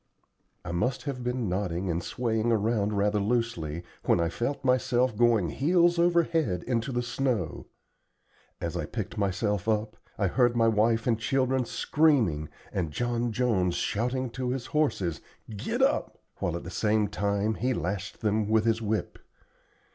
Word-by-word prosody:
I 90 - -4
must 125 +9 -1
have 135 -4 -4
been 125 -2 -1
nodding 90 -1 -2
and 85 +1 -1
swaying 115 -2 0
around 105 -1 +1
rather 105 +1 +2
loosely, 100 -8 -1 0.2
when - - +3
I 85 0 +1
felt 135 - -3
myself 125 -2 +2
going 115 -6 +3
heels 170 - +3
over 170 0 +4
head 150 - -1
into 120 +1 -1
the 120 -1 -1
snow. 120 - -2 0.9
As - - -3
I - - -2
picked - - -5
myself 100 +1 0
up 110 0 -1 0.2
I 100 - +1
heard 120 +5 +2
my 115 -1 +4
wife 115 +1 +2
and 115 -3 +1
children 130 +1 +1
screaming, 115 - +2 0.2
and 90 -4 -1
John 120 +7 -1
Jones 105 -7 +1
shouting 125 +7 -1
to 125 0 -3
his 125 -1 -2
horses, 120 - 0 0.3
"Git 100 - -1
up," - - +1 0.2
while 85 - -2
at 85 - -5
the 85 - -7
same 105 +2 +1
time 100 +1 0
he 125 +3 -1
lashed 100 -2 -3
them 105 -1 +1
with 110 0 +3
his 115 0 +2
whip. 110 0 -2
115 Hz, 160 wpm, -28 LUFS, 100-125 Hz, 0.9 s, over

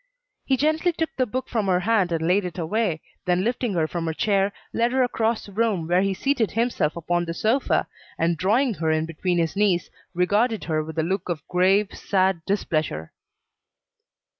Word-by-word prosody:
He 265 - +2
gently 310 +5 +2
took 320 -1 -2
the 255 -1 +1
book 255 +4 -3
from 220 -5 -1
her 180 -1 +2
hand 195 -4 +2
and 165 -1 0
laid 195 +3 +3
it 180 0 -6
away, 175 -1 -1 0.2
then, 180 0 +2
lifting 240 -1 -1
her 160 -2 +1
from 170 0 -3
the 160 -1 -2
chair, 200 0 +2 0.2
led 235 +1 +1
her 260 -1 +3
across 230 -2 0
the 205 - -12
room, 205 -6 0
where 175 +2 +3
he 195 0 0
seated 260 -2 +1
himself 225 -9 0
upon 175 +1 -1
the 165 0 -4
sofa, 230 +9 +1 0.3
and 170 +1 +1
drawing 225 - +2
her 165 -4 -2
in 155 0 +1
between 175 +2 -1
his 165 +1 0
knees, 195 -4 +1 0.2
regarded 210 +6 +1
her 155 -2 -1
with 160 +1 -8
a 160 - +2
look 185 +2 -2
of 170 -3 -4
grave, 190 +3 +3
sad 190 -3 0
displeasure. 155 - -1
190 Hz, 190 wpm, -24 LUFS, 170-225 Hz, 0.3 s, laid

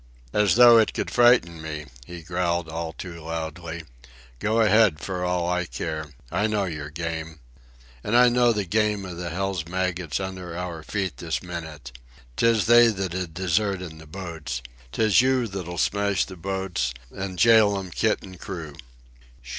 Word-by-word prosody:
"As 105 -3 +3
though 120 -1 +8
it 110 - +1
could - - -2
fright 120 -3 +6
me," 80 -2 -7 0.2
he 85 -2 -9
growled 85 0 -1
all 80 0 -4
too 85 0 -9
loudly. 80 +1 -5 0.6
"Go 110 - +1
ahead 105 -6 +4
for 90 0 -4
all 90 -1 0
I 90 0 0
care. 80 -2 -4 0.2
I 105 +2 +1
know 105 -2 0
your 75 -4 -5
game. 80 0 -5 0.6
And 115 +3 +2
I 125 0 +7
know 120 0 +4
the 105 -3 -1
game 105 +1 0
of 90 -2 -7
the 85 -1 -4
hell's 95 -1 -2
maggots 90 -3 -2
under 95 -3 -6
our 90 -3 -5
feet 95 +3 -3
this 80 0 -3
minute. 80 -7 -7 0.4
'Tis 115 - +3
they 120 +1 +7
that'd 95 -5 -3
desert 95 +2 0
in 80 -3 -9
the 80 - -13
boats. 80 -7 -6 0.3
'Tis 110 - +4
you 130 -1 +2
that'll 90 -3 -6
smash 100 -1 +1
the 95 - -10
boats 95 -7 -2 0.2
an' 95 -1 -5
jail 110 -3 +5
'm 95 -2 -6
kit 110 +5 0
an' 95 -2 -11
crew." 85 -6 -7
90 Hz, 165 wpm, -25 LUFS, 80-105 Hz, 0.6 s, though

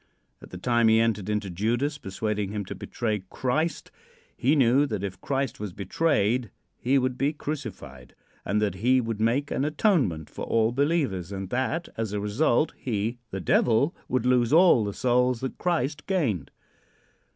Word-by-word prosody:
At - - -12
the 90 - -8
time 120 +4 +2
he 110 0 +5
entered 110 -3 0
into 105 -2 -2
Judas, 120 - -1
persuading 105 0 -3
him 105 -2 -3
to - - -6
betray 110 -5 -3
Christ, 155 +6 -1 0.4
he 145 - +2
knew 135 +1 +4
that 105 -6 -3
if 95 -2 -5
Christ 135 -3 -2
was 105 -3 -5
betrayed 115 - 0 0.3
he 130 +3 +2
would 130 -1 -1
be 140 +3 +1
crucified, 130 - -7 0.3
and 105 +1 0
that 105 - 0
he 125 +7 +2
would 115 -3 -3
make 125 +6 +1
an - - 0
atonement 150 - +1
for - - -8
all 115 0 +2
believers, 135 - 0
and 95 -1 -5
that, 130 +7 -1
as 110 -2 -2
a 105 - -1
result, 120 +7 +1
he, 115 0 -2
the 95 - -4
Devil, 125 - +2
would 125 -1 0
lose 125 -2 +3
all 165 -7 +6
the 100 -1 -3
souls 125 0 +2
that 130 - -5
Christ 150 -4 -1
gained. 115 - 0
120 Hz, 170 wpm, -26 LUFS, 105-140 Hz, 0.4 s, all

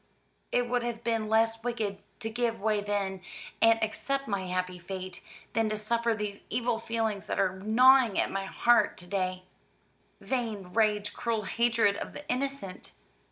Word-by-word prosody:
It 245 0 +2
would 245 0 +1
have 235 -1 -4
been 225 -2 0
less 225 +1 +2
wicked 220 -5 -2 0.2
to 225 - -2
give 235 0 -1
way 210 0 +1
then, 200 -2 -2 0.4
and 225 0 +6
accept 275 +5 -2
my 195 -3 -2
happy 180 0 -2
fate, 185 +1 -6 0.3
than 225 -1 +2
to 215 - -1
suffer 230 +2 +1
these 210 -1 -4
evil 240 -2 0
feelings 225 -3 -2
that - - -2
are 190 -1 +1
gnawing 240 +2 +5
at - - +1
my 195 0 -2
heart 240 +5 +3
to 180 - -7
day 185 -1 -2 0.8
vain 220 -8 -3
rage, 210 -2 +2
cruel 230 -3 -1
hatred 230 -1 +2
of - - -6
the 290 - -9
innocent!" 260 -7 -3
220 Hz, 160 wpm, -29 LUFS, 195-235 Hz, 0.8 s, and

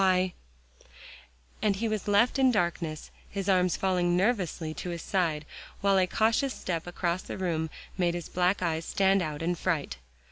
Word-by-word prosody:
"Why" 185 -1 +3 1.3
And 205 -2 +2
he 225 +4 -1
was 215 -2 -2
left 230 +6 +3
in 265 -1 +6
darkness, 170 -6 -1 0.2
his 200 -1 -4
arms 185 -2 +3
falling 180 -2 +1
nervously 180 -6 0
to 180 - -5
his 170 -1 -5
side, 165 -6 0 0.4
while 195 -1 +4
a 185 - +3
cautious 230 +7 +1
step 170 -2 -3
across 175 0 -1
the - - -7
room 165 -4 -1 0.3
made 175 -1 +2
his 175 -2 -5
black 180 +2 +1
eyes 165 -1 0
stand 195 +2 +2
out 155 -2 -3
in 175 +2 +1
fright. 160 - -2
180 Hz, 170 wpm, -29 LUFS, 170-195 Hz, 1.3 s, in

